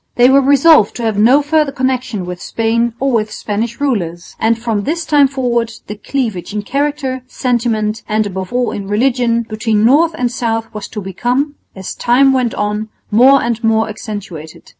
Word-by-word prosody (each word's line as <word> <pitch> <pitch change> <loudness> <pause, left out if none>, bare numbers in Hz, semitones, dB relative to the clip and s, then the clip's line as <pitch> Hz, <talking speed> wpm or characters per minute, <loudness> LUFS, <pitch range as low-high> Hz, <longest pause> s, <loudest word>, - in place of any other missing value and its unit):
They 250 +1 +5
were 275 +1 +5
resolved 280 -3 +5
to 240 - -5
have 220 -2 0
no 255 +7 +5
further 300 -1 +1
connection 255 -7 -2
with 180 0 -7
Spain 230 +1 -1
or 275 0 0
with 215 -3 0
Spanish 220 +3 -4
rulers, 180 -12 -3
and 225 0 +2
from 225 -3 -2
this 325 +8 -2
time 290 -2 +4
forward 240 -4 -1
the 210 - -6
cleavage 210 -5 -3
in 210 - -2
character, 280 0 -2
sentiment, 230 -4 -1
and 215 0 +1
above 190 -2 -5
all 245 0 0
in 200 -1 -6
religion, 235 +2 +1
between 220 -1 0
north 320 +7 +4
and 245 -1 -1
south 225 -2 -3
was 210 -1 -6
to 210 - -6
become, 245 - -1 0.2
as 190 -1 -6
time 265 +3 +3
went 250 -3 0
on, 210 +1 -2 0.2
more 260 +6 +5
and 235 0 -2
more 225 0 +2
accentuated. 205 -7 -8
235 Hz, 180 wpm, -15 LUFS, 215-265 Hz, 0.2 s, They